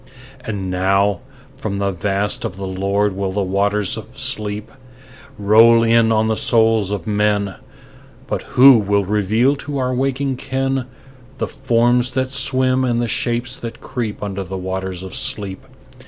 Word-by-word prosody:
And 100 -5 -4
now 95 +1 +1 0.4
from 100 -2 -4
the 100 0 0
Vast 100 +2 -1
of 110 -6 -4
the 95 0 -6
Lord 100 +2 -1
will 95 -1 -2
the 100 +1 -1
waters 100 +2 0
of 110 +4 -10
sleep 105 -6 -3 0.7
Roll 115 +3 +5
in 115 0 +3
on 110 0 +2
the 110 - +1
souls 110 -3 +2
of 105 -2 -4
men, 105 -2 0 0.7
But - - -3 0.2
who 130 -1 +9
will 100 -1 +1
reveal 105 +7 +2
to 145 0 -5
our 130 -1 -1
waking 135 +1 -1
ken 135 -1 -2 0.5
The - - -2
forms 120 0 +1
that 130 0 -1
swim 130 -1 +1
and 120 -2 0
the 120 - 0
shapes 120 +2 -2
that 115 -1 -8
creep 110 -5 -5
Under 100 -1 -4
the 95 +1 -6
waters 95 0 -4
of 95 - -8
sleep? 95 -3 -2
105 Hz, 155 wpm, -19 LUFS, 100-125 Hz, 0.7 s, who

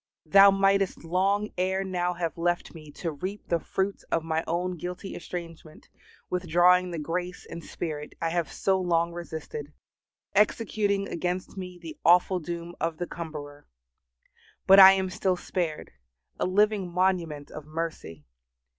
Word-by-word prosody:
Thou 195 +5 +8
mightest 195 -1 +2
long 195 +5 +1
ere 190 +1 +1
now 180 -2 -1
have 170 -2 -3
left 175 +1 -1
me 155 -3 -12
to 165 +2 -4
reap 185 +8 -6
the 170 - +2
fruits 195 +4 -2
of 165 - +1
my 160 0 -1
own 180 +2 -1
guilty 180 +3 -6
estrangement, 165 -3 -8 0.4
withdrawing 180 +1 +3
the 170 - -5
grace 175 +4 -4
and 170 0 -8
Spirit 150 -3 -6
I 165 - 0
have 170 -1 -1
so 190 -1 +1
long 170 -1 +1
resisted, 160 -3 -7 0.6
executing 205 -1 +1
against 180 +3 -3
me 180 -2 -7
the 165 -3 -10
awful 180 +3 +5
doom 170 +1 -6
of 165 -1 -2
the 175 - -3
cumberer. 150 -4 -8 1.0
But 195 +1 +8
I 190 0 +11
am 190 -1 -1
still 185 0 0
spared, 170 -4 -3 0.5
a - - +1
living 200 -1 +2
monument 170 -5 0
of 155 -1 -9
mercy. 155 - -5
175 Hz, 145 wpm, -27 LUFS, 165-190 Hz, 1.0 s, I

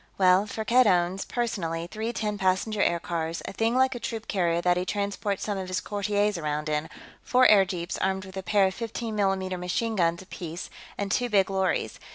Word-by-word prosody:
"Well, 185 +2 +4
Firkked 230 +3 +3
owns, 180 0 +2
personally, 170 -9 -2
three 220 +5 -4
ten 210 -3 -3
passenger 195 +3 +1
aircars, 170 -2 -1
a - - -6
thing 225 +3 +1
like 260 0 +3
a 245 - -6
troop 225 -1 -5
carrier 170 -4 +1
that 175 0 +2
he 180 - 0
transports 200 +1 -2
some 205 -2 -2
of 190 - -5
his 185 0 -1
courtiers 205 -1 0
around 150 0 -2
in, 150 +1 -1 0.3
four 255 0 +3
airjeeps 190 -4 +2
armed 190 0 0
with 190 0 -11
a 190 - -3
pair 195 +2 +3
of 190 - 0
15 230 0 -4
mm 190 -2 0
machine 220 +6 -1
guns 170 -1 +1
apiece, 175 -2 -7 0.3
and 200 -1 -2
two 245 0 +1
big 195 -3 +3
lorries. 190 -1 -1
195 Hz, 195 wpm, -27 LUFS, 180-215 Hz, 0.3 s, Well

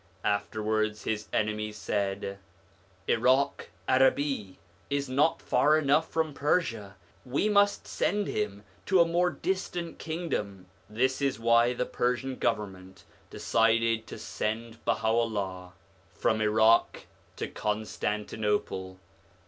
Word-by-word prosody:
Afterwards 110 +1 -1
his 105 -1 -2
enemies 105 0 -1
said, 100 -1 -2 0.3
' - - -33
Irak 130 +4 +2 0.2
Arabi 130 -5 +2
1 - - -26 0.3
is 140 0 -1
not 140 +5 +1
far 155 +1 +4
enough 155 +2 +2
from 160 -2 -1
Persia; 120 - -1 0.3
we 135 +10 0
must 205 -1 +3
send 205 0 0
him 150 - -3 0.2
to 190 -1 +4
a 170 - +7
more 175 +2 +2
distant 175 +1 -3
kingdom/ 130 - -4 0.2
This 130 +5 0
is 140 -4 0
why 115 +1 +4
the 125 - -1
Persian 125 +2 -1
Government 95 -5 -3 0.3
determined 115 0 +1
to - - -8
send 115 +1 -4
Baha'u'llah 100 -5 -1 0.4
from 110 0 +1
Irak 110 +1 +3 0.3
to - - -4
Constantinople. 105 -2 -2
115 Hz, 115 wpm, -29 LUFS, 105-140 Hz, 0.4 s, a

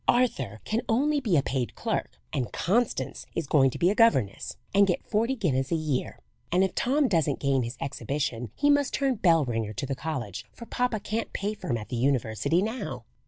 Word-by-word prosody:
"Arthur 135 - +1
can 220 +2 0
only 290 +6 +2
be 200 - +2
a 140 - +3
paid 130 -3 -2
clerk, - - -3
and 125 -3 -1
Constance 230 +6 0
is 165 - -1
going 135 -1 +4
to - - -6
be 175 +3 +3
a - - +2
governess 210 - +2 0.2
and 200 0 +5
get 180 - -1
forty 230 +5 +1
guineas 140 - 0
a - - +3
year, 155 -5 -2 0.3
and 180 +2 +4
if 190 - 0
Tom 280 +3 +2
doesn't 160 - +1
gain 135 -2 +2
his 120 +1 -4
exhibition 135 -4 -3
he 290 - +3
must 285 -1 +2
turn 275 -2 +2
bell 170 - +3
ringer 115 -3 -2
to 110 - -3
the 135 - -2
college, 130 - -4
for 235 - -11
papa 245 -2 -1
can't 220 +3 -3
pay 205 +2 -2
for 215 - -8
him 120 - +1
at 105 - -8
the 125 - -3
university 135 - +1
now!" 225 +4 -4
165 Hz, 210 wpm, -27 LUFS, -, 0.3 s, and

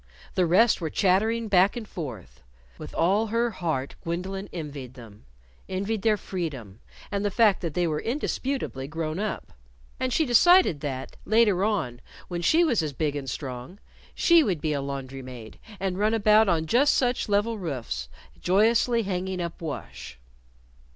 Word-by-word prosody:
The 180 -2 +2
rest 205 +5 +4
were 160 - -2
chattering 220 +7 +1
back 195 +3 +4
and 225 -3 -6
forth. 130 - -8 0.4
With - - -9
all 200 +7 +2
her 230 +2 0
heart 160 -9 -3
Gwendolyn 190 +4 -4
envied 145 -6 -7
them 110 -5 -14 0.4
envied 195 +3 -2
their 215 -1 +3
freedom, 135 - -5 0.3
and 200 0 -1
the 205 - +1
fact 210 -1 +3
that 165 -4 -4
they 175 - +2
were 155 -2 -1
indisputably 260 - -3
grown 155 +2 -3
up. 210 0 -4 0.5
And 255 0 -1
she 315 +6 +2
decided 295 - +5
that, 135 -2 -5
later 210 -4 +3
on, 155 - -1 0.3
when 175 -1 -3
she 320 - +4
was 245 - +2
as 150 -3 -3
big 150 +1 -1
and 135 -2 -4
strong, 130 +6 -6 0.4
she 340 -1 +5
would 185 - -1
be 155 0 -1
a 140 - -1
laundry 135 -1 -5
maid 125 -4 -10 0.2
and 190 -1 -2
run 215 +2 +2
about 215 -1 +5
on 160 -2 +1
just 255 - +3
such 245 -3 0
level 205 +2 +1
roofs, 120 - -4 0.3
joyously 230 +5 +3
hanging 190 -1 -3
up 170 -1 -5
wash. 150 - -7
185 Hz, 165 wpm, -26 LUFS, 145-220 Hz, 0.5 s, decided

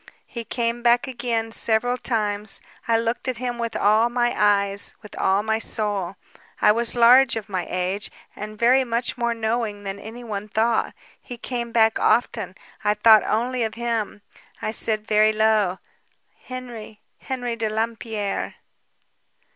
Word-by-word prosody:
"He 235 - -7
came 235 0 -2
back 240 +2 +3
again... 235 -3 -2
several 230 +2 +3
times... 210 -4 0 0.3
I 230 -1 +3
looked 230 +3 -2
at 255 -2 -1
him 245 0 -4
with 230 -1 -3
all 215 +3 +3
my 240 0 0
eyes, 200 -1 +1
with 210 - -11
all 195 +2 +2
my 220 0 0
soul... 205 -5 -2 0.4
I - - +5
was 235 +2 -1
large 245 +2 +6
of 220 -2 -5
my 185 -4 -3
age... 185 +3 -2 0.3
and 215 +1 -7
very 250 +4 +4
much 235 0 -1
more 235 -1 -1
knowing 220 -2 -2
than 195 0 -5
anyone 220 -1 -7
thought. 225 +2 0 0.3
He 245 - -9
came 235 0 -4
back 225 -1 +3
often... 215 -6 +1 0.3
I 210 0 +2
thought 215 0 +7
only 245 +3 -1
of 220 -1 -1
him. 230 -3 -3 0.4
I 215 - -3
said, 215 -1 +2
very 215 0 +4
low: 215 -4 +2 0.7
"'Henry... 240 -4 -8 0.2
Henry 245 -3 -4
de 225 -1 -2
Lampierre!' 220 -2 -3
225 Hz, 150 wpm, -23 LUFS, 210-235 Hz, 0.7 s, thought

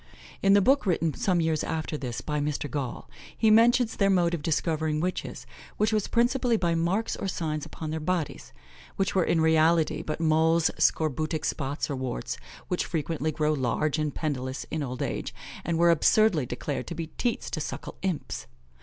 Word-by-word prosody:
In 195 0 +5
the 200 -1 +5
book 270 -2 +3
written 165 -3 +1
some 185 -7 +1
years 160 -2 0
after 160 -1 -3
this, 125 -4 -4
by 150 +2 -2
Mr. 145 0 -2
Gaul, 140 -5 -4 0.3
he 220 -1 +4
mentions 235 +1 +5
their 200 -1 +2
mode 175 -3 +3
of 170 - -2
discovering 155 -1 0
witches, 180 +3 -3 0.3
which 215 +1 +2
was 215 -2 +1
principally 240 0 +2
by 170 -4 +1
marks 175 +7 0
or - - -4
signs 155 -4 -3
upon 155 -1 -6
their 160 - -2
bodies, 165 -1 -2 0.4
which 195 - 0
were 185 - +3
in 165 0 +2
reality 160 0 +3
but 155 - -4
moles, 160 +1 +3
scorbutic 155 +1 +1
spots, 140 0 -2
or 140 - -3
warts, 130 - -4 0.3
which 180 - -1
frequently 155 -1 -2
grow 155 0 +1
large 150 +3 0
and 150 -2 -1
pendulous 130 -4 -3
in 160 - -2
old 130 0 -3
age, - - -4 0.3
and 170 -1 -1
were 170 0 +5
absurdly 170 - +3
declared 130 0 -4
to 170 - -5
be 165 0 -3
teats 240 -2 -1
to - - -2
suckle - - -5
imps. 185 -5 -3
160 Hz, 180 wpm, -27 LUFS, 150-185 Hz, 0.4 s, In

